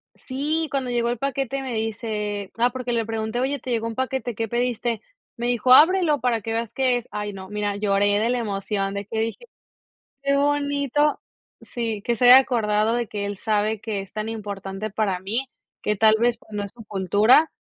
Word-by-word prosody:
sí, 300 +4 -2
cuando 265 -2 -2
llegó 235 0 +1
el 240 - -1
paquete 275 0 -2
me 255 -3 -4
dice, 210 -2 -3
ah, 240 +1 +3
porque 250 -1 -4
le 230 -2 0
pregunté: 220 +1 -3
"Oye, 275 +2 -1
¿te 250 - -6
llegó 230 -1 0
un 225 - -5
paquete, 260 -3 -2
¿qué 225 +1 -2
pediste?". 240 -1 -1 0.4
Me 240 - -2
dijo: 245 +1 +4
"Ábrelo 325 0 +6
para 240 -3 +1
que 225 +2 -5
veas 230 -1 -3
qué 255 -2 +2
es". 240 - -7
Ay 210 0 -3
no, 190 0 -9
mira, 210 -1 -2
lloré 205 0 +2
de 225 +2 +1
la 250 - +1
emoción 195 -2 -2
de 200 0 -4
que 220 +1 -3
dije: 225 - -3 0.8
"Qué 280 0 +1
bonito", 285 0 +1 0.4
sí, 225 -4 -4
que 235 +1 0
se 245 - +1
haya 250 +2 +11
acordado 220 -4 +2
de 240 -2 -1
que 205 -1 -4
él 200 -1 -4
sabe 215 0 0
que 210 -4 -3
es 195 - -12
tan 215 +1 -3
importante 200 -1 -5
para 195 -3 0
mí, 230 +8 -2 0.3
que 210 - 0
tal 220 +1 +5
vez, 235 0 +2
pues, 220 - -22
no 205 -1 -3
es 200 - -6
su 230 -2 -12
cultura, 205 - +4
225 Hz, 205 wpm, -23 LUFS, 210-255 Hz, 0.8 s, haya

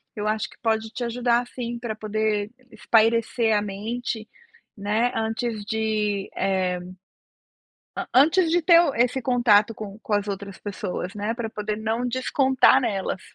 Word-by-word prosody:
eu 210 0 -3
acho 215 0 -1
que - - -18
pode 220 -1 0
te 240 +2 -5
ajudar 240 0 +1
sim 240 -1 -5
para 235 -2 -4
poder 215 -1 -1 0.2
espairecer 225 0 +2
a 205 - +2
mente, 215 +3 -4 0.5
né, 215 +4 0
antes 225 0 -2
de 215 -2 -1
eh, 185 -2 0 1.2
an - - -3
antes 325 +7 +5
de 345 +1 +2
ter 335 +1 +7
o 330 -5 +1
esse 245 +2 +1
contato 230 -4 +3
com 210 -1 -8
com 215 - -2
as 205 0 0
outras 200 -1 -5
pessoas, 190 -2 -5
né, 210 +2 -2
para 235 -2 -4
poder 210 -1 -3
não 225 +3 -2
descontar 260 +1 +3
nelas. 195 -6 -2
220 Hz, 155 wpm, -24 LUFS, 210-240 Hz, 1.2 s, ter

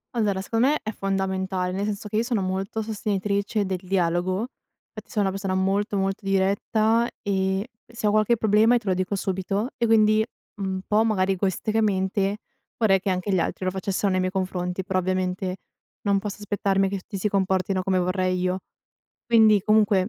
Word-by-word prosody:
Allora, 200 -4 +1
secondo 230 +5 +1
me 300 +2 +2
è 215 - -3
fondamentale, 190 -2 -1
nel 195 +2 -2
senso 210 0 -4
che 210 - -2
io 225 - +2
sono 245 - -8
sono 185 0 -1
molto 195 +3 -3
sostenitrice 205 -1 -1
del 185 -1 -2
dialogo, 185 +2 0 0.5
fatti - - -10
sono 210 - 0
una 195 - +1
persona 195 -1 -2
molto 200 +2 0
molto 195 +1 -1
diretta 215 +4 +2
e 190 -1 0 0.3
se 235 -1 -5
ho - - +3
qualche 215 +2 +3
problema 220 +2 +4
e - - +5
te 220 - -15
lo - - +3
dico 185 +2 -1
subito, 195 +4 -2
e 235 -2 0
quindi 215 -1 +4 0.4
un 190 -1 -2
po' 215 +1 +3
magari 195 -3 +1
egoisticamente 195 0 0 0.4
vorrei 200 -4 +4
che 195 - -2
anche 185 +2 -1
gli 185 - +3
altri 185 - -2
lo 185 - +1
facessero 195 +1 -1
nei 185 - +1
miei 185 0 0
confronti, 185 -1 -2
però 190 0 0
ovviamente 185 0 -1 0.5
non 200 -1 +2
posso 205 0 -5
aspettarmi 195 -1 +1
che 195 0 -3
tutti 195 +2 -7
si 195 - 0
comportino 190 -1 0
come 185 0 +1
vorrei 185 0 0
io. 180 +1 0 0.7
Quindi, 220 -3 +5
comunque 210 -2 +3
195 Hz, 185 wpm, -24 LUFS, 185-210 Hz, 0.7 s, e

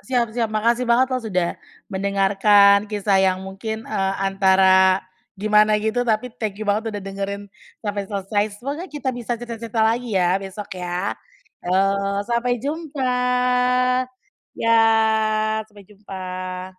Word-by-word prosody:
Siap 240 -3 -1
siap, 230 -1 -1
makasih 235 +3 0
banget 255 +2 +3
loh 255 - 0
sudah 185 -7 -1 0.4
mendengarkan 200 +1 +4
kisah 205 -2 +1
yang 190 0 +1
mungkin, 220 +4 -6
eee, 195 -2 -1
antara 190 -1 +4 0.3
gimana 210 +1 +3
gitu, 220 +3 -1
tapi 230 +2 0
thank 210 -3 -3
you 215 - -5
banget 210 +2 0
udah 205 -3 -6
dengerin 195 +1 -4 0.4
sampai 205 -1 -3
selesai. 205 0 -1
Semoga 285 - -5
kita 285 -4 -3
bisa 240 -1 -4
cerita 235 -1 -8
cerita 225 -1 0
lagi 230 -1 0
ya 180 +1 +2
besok 195 +1 -8
ya, 180 +1 -3 0.5
yo 180 +1 -1 0.5
sampai 240 +2 0
jumpa. 280 -1 -3 1.4
Ya 230 - +1 1.0
sampai 205 -2 -16
jumpa. 185 -2 -7
210 Hz, 130 wpm, -21 LUFS, 195-230 Hz, 1.4 s, mendengarkan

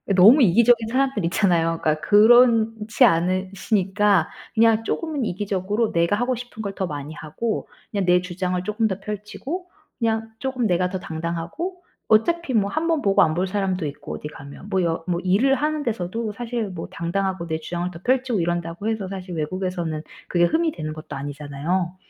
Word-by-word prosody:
너무 215 +11 +8
이기적인 230 +3 +4
사람들 265 -4 +1
있잖아요. 170 -3 +2
그러니까 155 0 +1
그렇지 225 +1 +5
않으시니까 190 +2 +1 0.3
그냥 225 0 +4
쪼금은 305 +2 -2
이기적으로 205 +2 -1
내가 170 +3 +2
하고 245 +4 0
싶은 245 -2 -8
걸 200 -2 -4
더 190 - -1
많이 145 0 -6
하고 190 +9 -4 0.2
그냥 200 -3 -1
내 180 0 +4
주장을 180 0 -2
쪼끔 215 +3 0
더 190 -1 -3
펼치고 210 - -6 0.3
그냥 225 -1 0
쪼금 260 -3 -1
내가 180 -1 +1
더 190 0 -4
당당하고 170 - -4 0.3
어차피 290 +7 +2
뭐 205 -3 +2
1 315 +8 -1
번 325 -3 +1
보고 195 -4 +4
안 155 - +3
볼 185 +2 0
사람도 190 -3 -1
있고 145 -1 -6
어디 - - -6
가면 145 +6 -11
뭐 190 -2 +1
여 165 -1 -1
뭐 175 -1 0
일을 215 +9 +3
하는 300 +2 -1
데서도 220 -1 -3
사실 235 0 -3
뭐 180 -3 -6
당당하고 185 +1 -2
내 160 -1 -2
주장을 175 +2 -3
더 165 - -10
펼치고 255 -3 +1
이런다고 175 +4 -2
해서 220 -4 -2
사실 185 -2 -6
외국에서는 170 -1 -3 0.3
그게 175 -1 +3
흠이 320 - +1
되는 155 - -5
것도 155 0 -8
아니잖아요. 145 +6 -3
195 Hz, 380 characters per minute, -23 LUFS, 175-230 Hz, 0.3 s, 너무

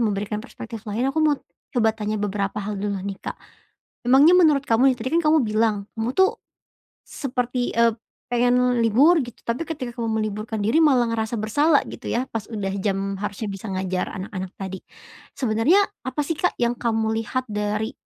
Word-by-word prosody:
memberikan 210 -1 -1
perspektif 230 -2 -8
lain, 230 +6 0
aku 315 - -2
mau 300 -2 +3 0.4
coba 220 -2 +4
tanya 215 0 -2
beberapa 200 0 -2
hal 210 0 -4
dulu 200 -1 -2
nih, 195 -1 -4
Kak. - - -5 0.7
Memangnya 290 +7 +7
menurut 300 -5 +5
kamu 255 +4 +5
nih, - - -5
tadi 255 - -2
kan - - +1
kamu 310 +1 +5
bilang 215 0 +2 0.2
kamu, 225 +3 -1
tuh, 380 +4 +5 0.7
seperti 250 -3 -3
ep 230 -1 +3 0.3
pengen 245 0 +3
libur 280 +10 +5
gitu. 240 -2 -8
Tapi 235 +8 -2
ketika 260 -7 -4
kamu 230 -1 -1
meliburkan 215 0 -3
diri 230 +10 +3
malah 255 -7 +4
ngerasa 225 0 -1
bersalah 285 +9 +3
gitu - - -9
ya, 245 - 0
pas 220 -2 -4
udah 205 -4 -3
jam 195 0 -2
harusnya 205 0 -4
bisa 195 +2 -7
ngajar 185 -1 -2
anak-anak 190 -1 -5
tadi. 190 -1 -5 0.6
Sebenernya 260 - +3 0.2
apa 295 +3 -1
sih, 330 - -1
Kak, 360 - +1
yang 240 0 +1
kamu 220 -2 0
lihat 255 +4 -2
dari 210 +1 -1
225 Hz, 175 wpm, -23 LUFS, 210-255 Hz, 0.7 s, Memangnya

